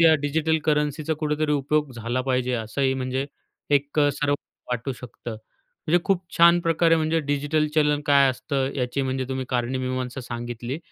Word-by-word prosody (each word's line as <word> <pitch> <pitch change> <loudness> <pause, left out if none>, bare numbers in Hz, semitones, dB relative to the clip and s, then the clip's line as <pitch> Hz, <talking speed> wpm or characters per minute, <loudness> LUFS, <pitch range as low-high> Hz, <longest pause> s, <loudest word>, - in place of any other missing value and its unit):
या 165 -1 +7
डिजिटल 160 +2 +1
करन्सीचा 150 0 0
कुठेतरी 150 0 0
उपयोग 145 0 0
झाला 120 +2 -2
पाहिजे 125 -1 +1
असंही 130 +4 0
म्हणजे 130 +1 -2 0.4
एक 145 +1 +1
अ, 145 -1 +5
सर्व 145 -1 0 0.4
वाटू 125 +2 -2
शकतं. 120 -1 -9 0.6
म्हणजे 175 +3 +3
खूप 195 -2 +1
छान 170 +1 +6
प्रकारे, 165 0 +3
म्हणजे 160 +1 +1
डिजिटल 145 +1 0
चलन 150 -1 +3
काय 140 -1 +6
असतं, 135 +1 -2
याची 130 +1 -1
म्हणजे 130 0 -1
तुम्ही 130 0 -2
कारणी 125 +1 -1
मीमांसा 130 0 -3
सांगितली. 120 +2 -5
140 Hz, 160 wpm, -24 LUFS, 130-155 Hz, 0.6 s, या